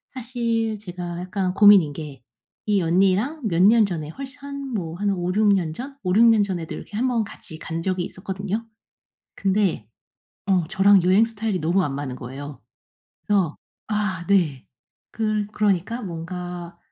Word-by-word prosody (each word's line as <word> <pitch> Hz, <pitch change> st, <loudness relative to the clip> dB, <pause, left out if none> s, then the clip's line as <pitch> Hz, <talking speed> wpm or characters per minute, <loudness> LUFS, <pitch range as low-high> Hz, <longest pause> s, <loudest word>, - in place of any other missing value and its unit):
사실 230 Hz, -3 st, -1 dB
제가 180 Hz, -3 st, -6 dB
약간 185 Hz, 0 st, -2 dB
고민인 205 Hz, -7 st, +7 dB
게 145 Hz, -4 st, -8 dB, 0.5 s
이 205 Hz, -2 st, +3 dB
언니랑 195 Hz, -, +2 dB
몇 170 Hz, -1 st, +1 dB
년 220 Hz, +2 st, +6 dB
전에 160 Hz, -6 st, -4 dB
훨씬 275 Hz, -, -9 dB
한 280 Hz, -2 st, -6 dB
뭐 165 Hz, -5 st, -3 dB
한 205 Hz, +1 st, 0 dB
5-6 190 Hz, +3 st, +1 dB
년 170 Hz, -5 st, 0 dB
전 270 Hz, -, -8 dB
5-6 195 Hz, +6 st, +4 dB
년 225 Hz, -2 st, +6 dB
전에도 180 Hz, -5 st, -4 dB
이렇게 205 Hz, -, -8 dB
1 250 Hz, +3 st, +1 dB
번 240 Hz, -3 st, +1 dB
같이 160 Hz, -5 st, -11 dB
간 165 Hz, +1 st, -4 dB
적이 185 Hz, -1 st, -1 dB
있었거든요. 200 Hz, +3 st, -4 dB, 0.7 s
근데 195 Hz, -, 0 dB, 0.6 s
어 185 Hz, -4 st, +2 dB
저랑 195 Hz, -1 st, +5 dB
여행 190 Hz, +5 st, +5 dB
스타일이 220 Hz, -3 st, -2 dB
너무 175 Hz, +5 st, +2 dB
안 145 Hz, -, -2 dB
맞는 140 Hz, -3 st, -4 dB
거예요. 135 Hz, +3 st, -8 dB, 0.7 s
그래서 190 Hz, -7 st, +1 dB, 0.3 s
아 205 Hz, -4 st, -2 dB
네 165 Hz, -10 st, +2 dB, 0.5 s
그러 215 Hz, -2 st, -1 dB
그러니까 210 Hz, +3 st, 0 dB
뭔가 175 Hz, -1 st, -6 dB
190 Hz, 265 characters per minute, -23 LUFS, 175-215 Hz, 0.7 s, 고민인